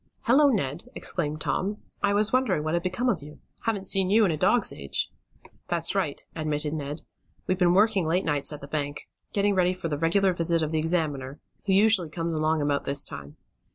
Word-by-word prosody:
"Hello, 270 Hz, +5 st, +5 dB
Ned!" 170 Hz, -, -1 dB
exclaimed 155 Hz, -3 st, -1 dB
Tom. 190 Hz, +9 st, -1 dB, 0.2 s
"I 200 Hz, 0 st, +2 dB
was 210 Hz, +2 st, +1 dB
wondering 255 Hz, -12 st, +2 dB
what 155 Hz, +1 st, -2 dB
had 170 Hz, -, +1 dB
become 185 Hz, +8 st, -1 dB
of 205 Hz, -11 st, +1 dB
you. 150 Hz, +1 st, -11 dB, 0.3 s
Haven't 205 Hz, -4 st, -1 dB
seen 190 Hz, 0 st, +2 dB
you 215 Hz, +2 st, +5 dB
in 185 Hz, -, +1 dB
a -, -, 0 dB
dog's 195 Hz, +8 st, +2 dB
age." 70 Hz, -1 st, -4 dB, 0.6 s
"That's 170 Hz, 0 st, +1 dB
right," 180 Hz, -8 st, -2 dB
admitted 150 Hz, -1 st, -1 dB
Ned. 150 Hz, 0 st, -5 dB, 0.4 s
"We've 185 Hz, 0 st, -1 dB
been 175 Hz, -1 st, +4 dB
working 200 Hz, -4 st, +3 dB
late 180 Hz, +4 st, +1 dB
nights 145 Hz, -2 st, 0 dB
at 150 Hz, -, -7 dB
the 140 Hz, -, -8 dB
bank. 145 Hz, -1 st, -4 dB, 0.2 s
Getting 200 Hz, 0 st, +2 dB
ready 185 Hz, -1 st, +2 dB
for 180 Hz, -2 st, -4 dB
the 145 Hz, -2 st, -2 dB
regular 185 Hz, +4 st, +2 dB
visit 165 Hz, -1 st, 0 dB
of 155 Hz, -, -2 dB
the 160 Hz, -, +1 dB
examiner, 155 Hz, -5 st, -1 dB, 0.3 s
who 190 Hz, -, +3 dB
usually 200 Hz, -4 st, +4 dB
comes 165 Hz, +1 st, -3 dB
along 155 Hz, -1 st, +1 dB
about 145 Hz, -1 st, 0 dB
this 140 Hz, 0 st, +3 dB
time. 70 Hz, +1 st, -9 dB
170 Hz, 205 wpm, -26 LUFS, 150-195 Hz, 0.6 s, Hello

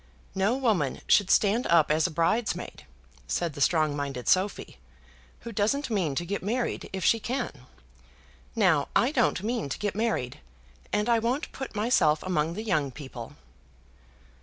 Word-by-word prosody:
"No 200 Hz, +6 st, +1 dB
woman 205 Hz, -, 0 dB
should 200 Hz, -2 st, +4 dB
stand 215 Hz, +4 st, +3 dB
up 165 Hz, -3 st, +4 dB
as 155 Hz, +3 st, +3 dB
a -, -, -5 dB
bridesmaid," 170 Hz, -, -1 dB, 0.4 s
said 170 Hz, -, -1 dB
the 145 Hz, -, -7 dB
strong 155 Hz, -1 st, +2 dB
minded 140 Hz, -4 st, -4 dB
Sophy, 190 Hz, +2 st, +1 dB, 0.6 s
"who 235 Hz, -, -7 dB
doesn't 230 Hz, +6 st, 0 dB
mean 175 Hz, -10 st, 0 dB
to 175 Hz, -, -2 dB
get 200 Hz, +3 st, -3 dB
married 235 Hz, +6 st, -2 dB
if 190 Hz, -1 st, -3 dB
she 230 Hz, -, +4 dB
can. 245 Hz, +2 st, -3 dB, 1.0 s
Now -, -, +3 dB
I -, -, +3 dB
don't 180 Hz, -, +1 dB
mean 225 Hz, -, -2 dB
to -, -, -3 dB
get 205 Hz, -2 st, -2 dB
married, 210 Hz, -, -2 dB, 0.5 s
and 210 Hz, +1 st, 0 dB
I 235 Hz, -1 st, +3 dB
won't 245 Hz, +7 st, -2 dB
put 265 Hz, -5 st, -7 dB
myself 185 Hz, -9 st, +2 dB
among 165 Hz, -3 st, -1 dB
the 215 Hz, -, -4 dB
young 155 Hz, -10 st, 0 dB
people." 130 Hz, -4 st, -9 dB
190 Hz, 160 wpm, -27 LUFS, 155-225 Hz, 1.0 s, should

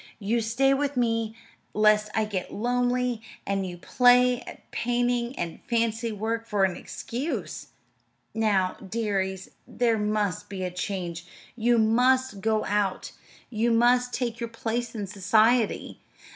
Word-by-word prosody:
You 225 Hz, +3 st, 0 dB
stay 250 Hz, +5 st, +2 dB
with 280 Hz, 0 st, -1 dB
me 230 Hz, -2 st, 0 dB, 0.4 s
lest 215 Hz, 0 st, +4 dB
I 220 Hz, -, +2 dB
get 195 Hz, -4 st, -4 dB
lonely; 245 Hz, +1 st, 0 dB, 0.2 s
and 195 Hz, -1 st, -1 dB
you 175 Hz, -1 st, -7 dB
play 250 Hz, +5 st, +4 dB
at -, -, -12 dB
painting 245 Hz, +1 st, 0 dB
and 170 Hz, -1 st, -4 dB
fancy 230 Hz, -1 st, 0 dB
work 225 Hz, +2 st, -3 dB
for 205 Hz, -2 st, +1 dB
an 185 Hz, -2 st, +2 dB
excuse. 260 Hz, +8 st, -5 dB, 0.7 s
Now, 205 Hz, -4 st, +1 dB
dearies, 190 Hz, -2 st, -2 dB, 0.2 s
there 230 Hz, -3 st, +1 dB
must 210 Hz, -3 st, -1 dB
be 190 Hz, -1 st, -5 dB
a 180 Hz, -, -2 dB
change. 180 Hz, -2 st, -4 dB, 0.3 s
You 240 Hz, 0 st, +2 dB
must 245 Hz, 0 st, +3 dB
go 220 Hz, +1 st, +1 dB
out. 205 Hz, -2 st, -1 dB, 0.4 s
You 230 Hz, +1 st, +1 dB
must 245 Hz, +2 st, +3 dB
take 235 Hz, -3 st, -2 dB
your 235 Hz, -1 st, -3 dB
place 230 Hz, +1 st, -3 dB
in 210 Hz, -2 st, -3 dB
society. 215 Hz, +4 st, +2 dB
225 Hz, 135 wpm, -26 LUFS, 205-245 Hz, 0.7 s, lest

